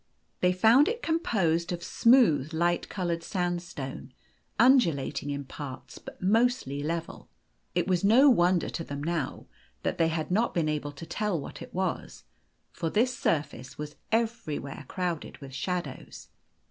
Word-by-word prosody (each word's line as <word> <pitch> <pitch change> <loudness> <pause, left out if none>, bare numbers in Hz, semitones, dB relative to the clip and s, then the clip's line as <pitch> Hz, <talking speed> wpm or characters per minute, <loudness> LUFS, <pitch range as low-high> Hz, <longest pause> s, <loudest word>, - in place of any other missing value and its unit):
They 180 - +3
found 225 - +5
it 470 +2 -2
composed 185 - +1
of 175 -1 -4
smooth, 190 - +4
light 175 +1 +1
coloured 175 -3 -2
sandstone, 175 -7 -4 0.5
undulating 165 - +3
in 140 -1 -3
parts, 135 -1 -8
but - - -11
mostly 210 - +1
level. 165 +2 -4 0.5
It - - +1
was 180 -1 +1
no 235 +8 +6
won 180 -8 +5
der - - -3
to 165 - -4
them 140 -2 -6
now 165 -4 -2 0.4
that - - -2
they 165 - +4
had 160 +1 -2
not 220 +6 +1
been 165 -3 +1
able 150 -1 -2
to 145 +4 -9
tell 210 -2 -1
what 140 - -8
it - - -9
was, 185 -1 -3 0.5
for 165 - -3
this 240 +7 +1
surface 145 -5 -2
was 150 0 -6 0.2
everywhere 165 - -2
crowded 175 -4 -3
with 135 -2 -11
shadows. 170 -1 -5
170 Hz, 150 wpm, -28 LUFS, 150-210 Hz, 0.5 s, no